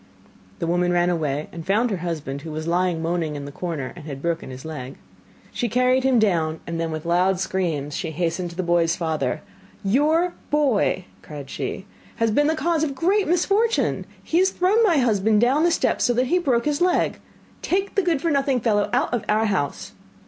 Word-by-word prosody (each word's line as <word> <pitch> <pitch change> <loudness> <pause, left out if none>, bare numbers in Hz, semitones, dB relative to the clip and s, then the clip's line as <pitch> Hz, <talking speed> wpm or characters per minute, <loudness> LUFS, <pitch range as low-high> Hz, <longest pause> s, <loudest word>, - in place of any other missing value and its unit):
The - - -3
woman 175 +1 +1
ran 175 0 +2
away 150 -3 -2
and 165 - -7
found 215 +7 +1
her 195 - -1
husband, 155 -5 -4
who 160 +1 -7
was 155 +1 -4
lying 175 -1 0
moaning 165 -2 -1
in 145 -1 -6
the 140 - -7
corner, 155 -4 -4
and 170 -4 -11
had 140 -3 -6
broken 170 -1 -2
his 130 +2 -9
leg. 140 -5 -6 0.6
She 240 - -2
carried 255 +3 +2
him 265 -2 +3
down, 165 -7 +1
and 165 0 -3
then 165 - -1
with 155 0 -5
loud 180 +2 +2
screams 165 -7 -2
she 170 - -3
hastened 170 +2 -2
to 170 - -11
the 185 - -2
boy's 170 -1 +2
father, 155 -7 -2 0.4
'Your 310 - +2 0.2
boy,' 270 -10 +1 0.2
cried 145 -3 -9
she, 190 - -4 0.3
'has 230 -1 +1
been 290 +7 +3
the 320 - +2
cause 330 0 0
of 315 - +1
a - - -5
great 380 +9 +1
misfortune! 400 +7 +1 0.2
He 335 - +1
has 380 +1 +4
thrown 380 +5 +2
my 355 -8 +4
husband 220 -4 +3
down 255 +6 +3
the 345 - +4
steps 335 - +1
so 245 - +2
that 250 +2 +2
he 355 +8 +2
broke 250 -8 +1
his 295 +2 0
leg. 360 0 +2 0.4
Take 390 +2 -1
the 400 - +2
good 335 -6 0
for 335 - +1
nothing 275 -2 +1
fellow 210 -3 +1
out 245 0 +1
of 240 - 0
our 215 +1 +3
house. 190 -9 -2
190 Hz, 210 wpm, -23 LUFS, -, 0.6 s, has